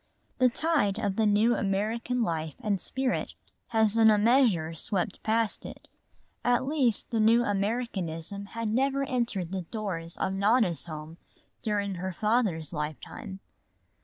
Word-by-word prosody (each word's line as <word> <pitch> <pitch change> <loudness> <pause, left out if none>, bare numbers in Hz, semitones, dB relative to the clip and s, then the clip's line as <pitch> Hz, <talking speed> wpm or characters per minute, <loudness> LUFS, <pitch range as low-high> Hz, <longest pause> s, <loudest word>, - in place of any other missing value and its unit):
The 255 -1 +5
tide 280 -8 +1
of 205 -3 -1
the 220 0 +2
new 210 +3 +4
American 225 +5 -1
life 160 -6 -2
and 200 -3 -1
spirit 260 -1 -2 0.3
has 220 -1 +2
in 220 -1 +7
a 215 - +5
measure 210 -8 +3
swept 190 +4 -2
past 220 0 0
it. - - -10 0.6
At 245 +1 +2
least 265 -7 0
the 230 - +1
new 225 +2 +5
Americanism 200 -4 -2
had 230 -1 -1
never 270 +4 +1
entered 235 -9 -1
the 190 -1 -2
doors 170 -3 -5
of 190 - -1
Nona's 200 -3 +2
home 155 +1 -8 0.4
during 205 -3 -1
her 190 0 -3
father's 205 -7 0
lifetime. 155 +5 -6
210 Hz, 140 wpm, -28 LUFS, 185-235 Hz, 0.6 s, in